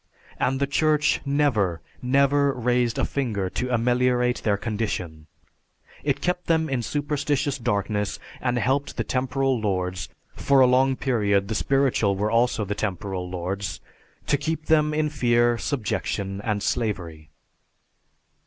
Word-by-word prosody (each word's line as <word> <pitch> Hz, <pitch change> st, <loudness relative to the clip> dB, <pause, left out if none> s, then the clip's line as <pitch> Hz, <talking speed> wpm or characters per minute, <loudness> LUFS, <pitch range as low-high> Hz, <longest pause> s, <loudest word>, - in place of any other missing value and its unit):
And 135 Hz, +1 st, +1 dB
the 140 Hz, -, +2 dB
Church 150 Hz, +1 st, +2 dB
never, 120 Hz, -, +1 dB, 0.2 s
never 140 Hz, +2 st, +3 dB
raised 120 Hz, -1 st, 0 dB
a -, -, +1 dB
finger 105 Hz, -9 st, -2 dB
to 125 Hz, 0 st, -3 dB
ameliorate 125 Hz, +1 st, +2 dB
their 100 Hz, -2 st, +1 dB
condition. 95 Hz, -8 st, -4 dB, 0.8 s
It -, -, 0 dB
kept 180 Hz, 0 st, -1 dB
them 160 Hz, -1 st, +2 dB
in 130 Hz, -2 st, 0 dB
superstitious 145 Hz, +1 st, -1 dB
darkness 105 Hz, -3 st, -1 dB, 0.2 s
and 125 Hz, -1 st, 0 dB
helped 135 Hz, +5 st, 0 dB
the -, -, 0 dB
temporal 130 Hz, 0 st, 0 dB
lords 90 Hz, -3 st, -2 dB, 0.3 s
for 140 Hz, -1 st, +3 dB
a 130 Hz, -, +8 dB
long 130 Hz, +1 st, +3 dB
period 100 Hz, -7 st, +1 dB
the -, -, -1 dB
spiritual 125 Hz, -4 st, +2 dB
were 105 Hz, +2 st, -1 dB
also 115 Hz, -2 st, +2 dB
the 100 Hz, -, -2 dB
temporal 95 Hz, -3 st, -3 dB
lords 95 Hz, +2 st, -4 dB, 0.5 s
to 145 Hz, -, +2 dB
keep 155 Hz, +2 st, -3 dB
them 150 Hz, -1 st, +3 dB
in 150 Hz, 0 st, 0 dB
fear, 120 Hz, -4 st, +2 dB
subjection 100 Hz, -6 st, -2 dB
and 105 Hz, -2 st, -1 dB
slavery." 85 Hz, -10 st, -2 dB
120 Hz, 135 wpm, -24 LUFS, 100-140 Hz, 0.8 s, a